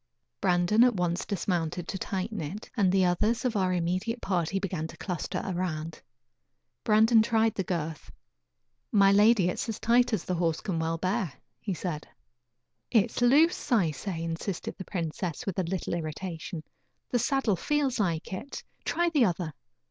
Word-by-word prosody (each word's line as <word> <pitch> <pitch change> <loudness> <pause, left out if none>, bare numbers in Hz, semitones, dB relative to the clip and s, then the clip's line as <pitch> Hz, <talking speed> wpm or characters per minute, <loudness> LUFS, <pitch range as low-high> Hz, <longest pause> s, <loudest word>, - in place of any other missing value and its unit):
Brandon 180 +4 +4
at 245 -3 +4
once 175 -1 -1
dismounted 175 -3 -1
to 195 - -3
tighten 195 +2 -3
it, 185 +9 -6
and 195 -5 +3
the 190 -1 +4
others 210 +8 +1
of 240 -3 0
our 185 -2 +2
immediate 185 +7 -1
party 180 -2 -1
began 180 -5 -2
to - - -12
cluster 180 -4 -3
around. 165 -4 -3 0.8
Brandon 220 +1 +5
tried 225 0 +2
the 195 - -2
girth. 165 -3 -4 0.8
"My 200 -2 +6
lady, 205 -1 +5
it 180 - +1
is - - -3
as 220 - -3
tight 240 +2 +3
as 215 -7 0
the 185 - -2
horse 165 -2 0
can 185 -6 -2
well 165 0 -1
bear," 185 0 -1 0.3
he 195 -4 -3
said. 160 -4 -4 0.8
"It 225 -1 +3
is - - -4
loose, 285 +8 +4
I 190 -10 +4
say," 165 +2 -5
insisted 165 +3 -4
the 190 - -8
princess, 170 -2 -3
with 195 -2 -2
a - - +2
little 180 +1 -3
irritation; 165 0 -5 0.5
"the 245 - +2
saddle 245 -4 +1
feels 280 - 0
like 170 -4 -1
it. 225 +9 -6 0.2
Try 345 0 +1
the 285 -7 +4
other." 175 -4 -1
190 Hz, 170 wpm, -28 LUFS, 170-220 Hz, 0.8 s, My